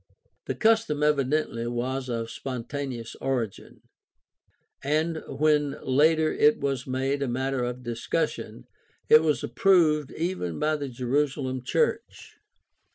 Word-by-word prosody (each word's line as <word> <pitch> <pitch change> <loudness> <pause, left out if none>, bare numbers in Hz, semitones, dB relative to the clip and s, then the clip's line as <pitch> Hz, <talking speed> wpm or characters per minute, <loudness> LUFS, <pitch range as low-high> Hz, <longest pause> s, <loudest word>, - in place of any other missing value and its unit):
The - - -2
custom 220 -10 +2
evidently 140 -4 +1
was 130 +2 -3
of 115 -1 -3
spontaneous 130 -2 -5
origin, 120 -7 -3 1.0
and 155 +3 0
when 150 0 +1
later 155 +4 +3
it 150 +1 +4
was 135 -2 -2
made 135 +2 -1
a 140 - 0
matter 130 +1 -1
of 125 +1 -4
discussion 115 - -3 0.4
it 155 - +8
was 155 -2 0
approved 160 -7 +3
even 165 - -3
by 155 +1 +1
the 140 -2 -5
Jerusalem 130 +1 -1
church. 460 - -2
135 Hz, 115 wpm, -26 LUFS, 125-150 Hz, 1.0 s, it